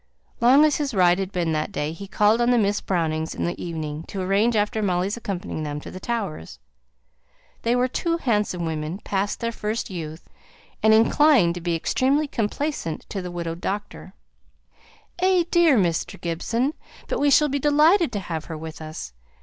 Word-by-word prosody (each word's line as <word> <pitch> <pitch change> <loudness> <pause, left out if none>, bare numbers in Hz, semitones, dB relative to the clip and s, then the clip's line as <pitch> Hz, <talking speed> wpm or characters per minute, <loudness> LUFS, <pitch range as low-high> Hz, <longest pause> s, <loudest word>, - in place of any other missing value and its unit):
Long 260 +6 +6
as 300 - +2
his 285 -6 -2
ride 180 -1 +4
had 190 0 -3
been 175 -4 -1
that 155 -1 -1
day, 150 +1 -2
he 195 +5 -8
called 210 +4 +3
on 240 - +3
the 245 - +4
Miss 205 -2 +1
Brownings 160 -3 -1
in - - -3
the 175 - -3
evening, 155 -3 -4
to 195 - -6
arrange 200 +5 +2
about 210 +1 0
Molly's 185 +1 0
accompanying 195 -8 -5
them 150 -1 -4
to - - -10
the 185 - -8
Towers. 200 - -4 1.0
They 235 +1 +1
were 250 +1 +2
tall 335 +6 -1
handsome 210 - 0
women, 160 +2 -3
past 200 +1 -2
their 230 0 -1
first 220 -1 -3
youth, 160 -2 -7 0.5
and 220 - +5
inclined 225 - +5
to 175 - -7
be 170 0 -1
extremely 275 - +1
complaisant 230 - -2
to 195 - -4
the 180 - -6
widowed 170 -1 -5
doctor. 200 -1 -5 1.0
"Eh 370 -1 +3
dear! 335 -6 +5
Mr. 170 -5 0
Gibson, 230 - -1 0.3
but - - -2
we 285 - +3
shall 300 +2 +5
be 280 +1 -1
delighted 305 +3 +4
to 205 - -1
have 165 -4 -5
her 160 - -6
with 160 0 -8
us. 155 - -7
200 Hz, 180 wpm, -24 LUFS, 170-245 Hz, 1.0 s, Long